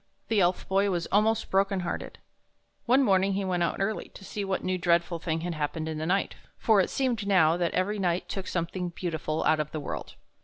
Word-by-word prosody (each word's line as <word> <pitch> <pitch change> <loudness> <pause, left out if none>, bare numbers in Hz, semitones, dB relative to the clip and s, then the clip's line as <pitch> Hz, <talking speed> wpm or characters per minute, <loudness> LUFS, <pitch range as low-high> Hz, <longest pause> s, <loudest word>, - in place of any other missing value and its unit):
The 220 -2 +3
Elf 180 -1 +1
Boy 195 +1 +2
was 175 -3 -1
almost 215 +2 +2
broken 195 0 +2
hearted. 175 - -4 0.7
One 260 +3 +5
morning 195 -3 +3
he 195 0 -1
went 180 -2 0
out 170 - 0
early, 205 +3 -2
to 195 - -11
see 205 - -4
what 195 -1 -2
new 185 - 0
and 180 - -3
dreadful 170 -1 +2
thing 160 -1 -2
had 175 0 -3
happened 155 +1 -3
in 160 -1 -3
the 155 - -2
night, 195 +2 +1 0.2
for 215 -3 +4
it - - -1
seemed 240 -6 -1
now 170 -5 +5
that 175 -1 -1
every 200 +3 0
night 175 -2 0
took 195 -2 -5
something 175 +1 -2
beautiful 160 -3 -3
out 155 - +3
of 150 -1 -1
the 155 - -3
world. 145 - -6
185 Hz, 225 wpm, -28 LUFS, 170-200 Hz, 0.7 s, One